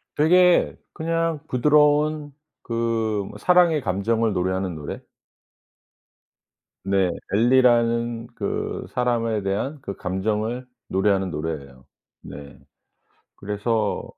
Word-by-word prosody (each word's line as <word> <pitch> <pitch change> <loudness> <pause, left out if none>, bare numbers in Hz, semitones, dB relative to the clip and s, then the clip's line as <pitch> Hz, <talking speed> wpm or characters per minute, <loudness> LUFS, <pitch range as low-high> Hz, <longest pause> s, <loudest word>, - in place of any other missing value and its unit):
되게 180 +4 +4 0.2
그냥 165 -1 -1
부드러운 150 +2 +2 0.3
그 115 -3 -1
사랑의 175 -4 +4
감정을 110 +3 0
노래하는 95 0 -1
노래? 75 -2 -7 1.8
네. 95 -2 +1 0.2
엘리라는 120 0 +3
그 100 - -3
사람에 115 -3 0
대한 100 +10 -2
그 100 -6 -6
감정을 110 +6 -2 0.2
노래하는 95 -1 +1
노래예요. 70 -5 -6 0.4
네. 70 0 -11 0.8
그래서 105 +1 -1
115 Hz, 205 characters per minute, -23 LUFS, 95-135 Hz, 1.8 s, 되게